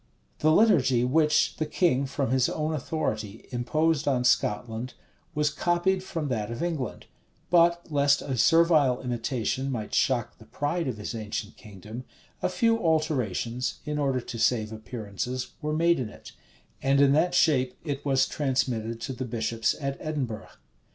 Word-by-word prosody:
The 155 - +3
liturgy 140 - +4
which 150 +4 +2
the 155 - -1
king, 140 -5 +1
from 135 -2 -2
his 130 -1 +3
own 155 0 -2
authority, 110 -8 -3
imposed 155 +5 0
on 130 -3 +2
Scotland, 120 +1 0 0.4
was 150 0 +1
copied 175 +4 +1
from 165 -5 -4
that 110 -4 -2
of 115 +6 -4
England: 160 -8 -3 0.5
but, 170 0 +4
lest 140 -1 +3
a 135 -2 -3
servile 155 -2 +4
imitation 125 +2 -2
might 110 -5 -4
shock - - +1
the - - -14
pride 160 +3 -2
of 125 -4 -3
his 105 +3 -5
ancient 105 -1 -5
kingdom, 105 +3 -10 0.4
a - - +1
few 230 +4 +2
alterations, 130 - 0
in 150 0 -2
order 135 -3 +1
to 120 -1 -7
save 110 -2 +1
appearances, 110 +2 -5
were 150 0 -2
made 170 +1 +3
in 120 -4 -3
it; - - -13 0.5
and 135 +1 +3
in 140 -1 +6
that 175 +5 +2
shape 130 -7 +3
it 145 -3 -4
was 135 -2 +2
transmitted 125 -5 -1
to 135 - -4
the 130 +1 -4
bishops 115 -1 -1
at 140 -1 -3
Edinburgh. 130 -8 -4
135 Hz, 160 wpm, -27 LUFS, 120-155 Hz, 0.5 s, in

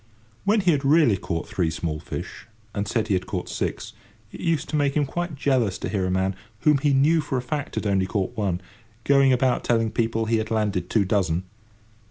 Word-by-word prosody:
When 210 +1 +3
he 180 -2 +3
had 145 -3 0
really 145 -6 +5
caught 85 -3 -4
three 85 -4 0
small 80 0 -3
fish, - - -7 0.3
and 100 0 -2
said 110 +1 0
he 105 - +1
had 90 -1 -1
caught 95 -3 -3
six, - - -3 0.4
it - - -10
used 165 -4 0
to - - -2
make 145 -2 +1
him 145 - +2
quite 175 +3 -3
jealous 130 -8 +1
to - - -4
hear 95 -3 0
a - - -1
man, 95 +1 0 0.3
whom 150 -2 +4
he 145 +1 +2
knew 150 +4 +4
for 135 -3 -2
a - - -1
fact 145 +2 -4
had - - -2
only 95 -2 +1
caught 95 -2 -2
one, 95 -4 -1 0.4
going 140 0 +5
about 130 0 +2
telling 115 -2 +1
people 115 0 0
he 115 +1 +2
had 110 - -2
landed 105 -5 -1
two 105 -3 +2
dozen. 95 -3 +1
115 Hz, 220 wpm, -24 LUFS, 95-140 Hz, 0.4 s, really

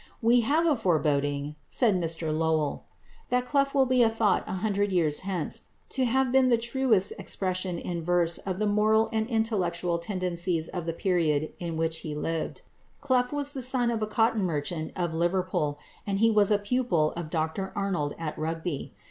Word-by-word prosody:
"We 235 +2 +4
have 300 +8 +2
a 315 -3 +4
foreboding," 145 - 0
said 235 -5 +3
Mr 165 -3 -1
Lowell, 160 -2 0 0.4
"that 250 0 +1
Clough 275 +1 +2
will 275 -2 +3
be 255 -1 +4
thought 225 -2 +1
a - - -4
hundred 200 +1 0
years 160 -5 +2
hence, 185 -4 -4 0.2
to 260 -1 0
have 260 +1 +2
been 260 -1 +4
the 235 - +4
truest 235 -4 +1
expression 185 -2 -2
in 170 0 -4
verse 170 -1 +2
of 185 -2 -4
the 215 - 0
moral 215 +2 +3
and 220 +1 0
intellectual 180 -7 0
tendencies 175 -2 -1
of 175 -2 -5
the 165 - -1
period 160 -4 0
in 170 -2 -4
which 160 0 0
he 150 -2 -5
lived." 165 +2 -3 0.4
Clough 255 -3 +2
was 290 -1 -1
the 275 -3 -5
son 250 -1 0
of 225 -2 -2
a 215 - 0
cotton 225 -1 +2
merchant 155 -1 -2
of 175 -2 -2
Liverpool, 170 -3 0 0.3
and 195 -1 0
he 225 +2 +4
was 210 -2 +4
a 210 - +4
pupil 205 -8 +1
of 170 -2 -6
Dr 160 +4 -2
Arnold 185 -8 -1
at 160 -2 -4
Rugby. 160 -1 -4
185 Hz, 180 wpm, -27 LUFS, 165-225 Hz, 0.4 s, We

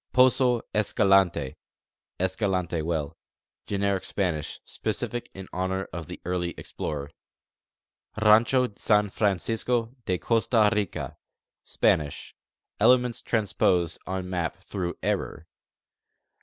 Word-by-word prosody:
Poso 125 -1 +4
Escalante 95 -9 +3 0.7
(Escalante 95 -3 0
well): 80 -1 -2 0.5
Generic 100 -1 0
Spanish, 90 -7 -2
specific 120 -1 -3
in 95 -1 -8
honor 95 +1 -2
of 80 -2 -5
the - - -8
early 90 -1 -2
explorer. 70 -1 -5 1.1
Rancho 115 +3 +4
San 105 -1 +3
Francisco 115 +5 0
de 90 - +1
Costa 110 0 +3
Rica: 105 -4 -3 0.5
Spanish 75 -2 0 0.5
(elements 125 -1 +4
transposed 95 -6 +1
on 95 0 -3
map 90 -2 -2
through 90 -4 -4
error). - - -2
95 Hz, 95 wpm, -26 LUFS, 90-110 Hz, 1.1 s, Poso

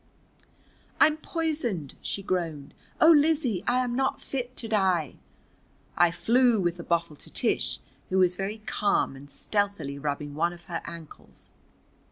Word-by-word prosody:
"I'm 310 0 +5
poisoned!" 300 - -2
she 195 - -4
groaned. 165 -7 -3 0.3
"Oh, 320 - +8
Lizzie, 295 - +3
I 250 +1 +3
am 245 -1 -2
not 265 +1 0
fit 255 -2 -5
to 230 - -3
die!" 190 -8 +1 0.8
I 175 - +5
flew 230 +7 +3
with 175 -2 0
the 170 - -7
bottle 170 -2 -1
to - - -7
Tish, - - +2 0.3
who 190 - +1
was 180 -1 +4
very 205 +3 -4
calm 205 -9 +1
and 140 +1 -12
stealthily 200 -11 -2
rubbing 145 0 -3
one 170 +4 0
of 175 0 -14
her 170 0 -5
ankles. 170 -2 -10
185 Hz, 150 wpm, -27 LUFS, 165-245 Hz, 0.8 s, Oh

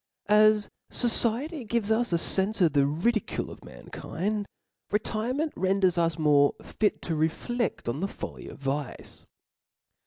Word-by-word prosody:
As 210 0 +5 0.2
fociety 245 +4 +1
gives 220 -1 0
us 235 0 +1
a - - +3
fenfe 195 +5 +2
of 165 -5 +4
the 140 -1 +3
ridicules 195 +9 -1
of - - -12
mankind, 200 - -5 0.4
retirement 235 +8 -1
renders 190 -1 +2
us 170 -2 +1
more 145 -2 +4
fit 210 -2 -1
to 165 - -2
refledk 165 - -2
on 120 +5 -2
the 195 - -1
folly - - -8
of - - -10
vice. 140 -1 -5
200 Hz, 135 wpm, -27 LUFS, 160-225 Hz, 0.4 s, As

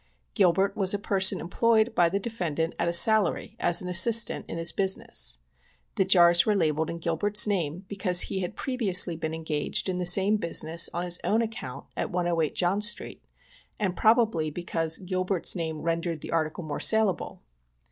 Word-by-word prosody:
Gilbert 190 +1 +1
was 195 -1 +1
a - - -2
per 200 -1 -3
son 190 0 +5
employed 220 +6 0
by 175 -5 +2
the 195 +3 -3
defendant 170 -7 -4
at - - -1
a - - 0
salary, 215 +1 +3
as 175 +1 +2
an - - -7
assistant^ 220 +6 +4
in - - -7
his 165 0 0
business. 190 - 0 0.6
The 190 - 0
jars 175 -2 +4
were 215 - 0
labelled 160 -3 -1
in 170 - -6
Gilbert's 205 +7 +3
name^ 180 -4 -3
because 185 -3 +2
he 190 - -4
had 180 -2 -6
previously 200 -9 +1
been 160 0 -5
engaged 160 0 -3
in 180 -1 -3
the 180 - -2
same 195 +4 +5
busi 170 -3 +2
ness 165 +2 +1
on 175 - -5
his 175 0 0
own 225 +3 0
account, 220 - -8
at - - -4
108 175 -3 -2
John 185 +3 -1
street, 220 +3 -1 0.6
and 190 -4 -2
probably 220 -7 +1
because 165 0 -3
Gilbert's 185 -1 -2
name 160 -3 -5
rendered 165 -1 -3
the - - -8
article 160 +1 -3
more 150 -2 -6
saleable. 220 -4 0
180 Hz, 180 wpm, -25 LUFS, 165-200 Hz, 0.6 s, son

